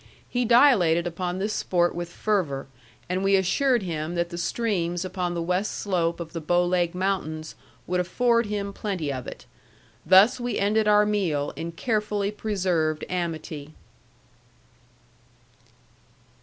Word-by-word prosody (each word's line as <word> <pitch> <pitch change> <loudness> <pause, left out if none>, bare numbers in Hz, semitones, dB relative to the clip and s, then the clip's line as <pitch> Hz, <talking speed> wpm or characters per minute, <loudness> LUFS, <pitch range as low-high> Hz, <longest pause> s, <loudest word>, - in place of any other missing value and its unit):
He 245 0 -1
dilated 215 - +5
upon 175 +1 -3
this 205 +3 -2
sport 175 -1 +1
with 175 0 -5
fervor, 175 -11 -1 0.4
and 185 +2 -1
we 195 0 +4
assured 235 +5 +2
him 165 -1 -3
that 170 0 -1
the 170 - -6
streams 175 -3 -1
upon 180 -1 -3
the 170 - -2
west 180 +4 -1
slope 175 -4 -1
of 165 -1 -7
the 165 - -4
Bow 175 +3 +2
Leg 175 -1 0
Mountains 180 -5 -2 0.3
would 180 0 -1
afford 235 +5 +2
him 200 -1 -3
plenty 180 -10 -3
of 130 -2 -6
it. - - -9 0.6
Thus 190 +9 +6
we 245 0 -2
ended 210 +2 +2
our 210 0 +5
meal 180 -9 0
in 165 +1 -5
carefully 210 0 -1
preserved 180 -7 -1
amity. 160 -4 -4
180 Hz, 140 wpm, -25 LUFS, 170-210 Hz, 0.6 s, Thus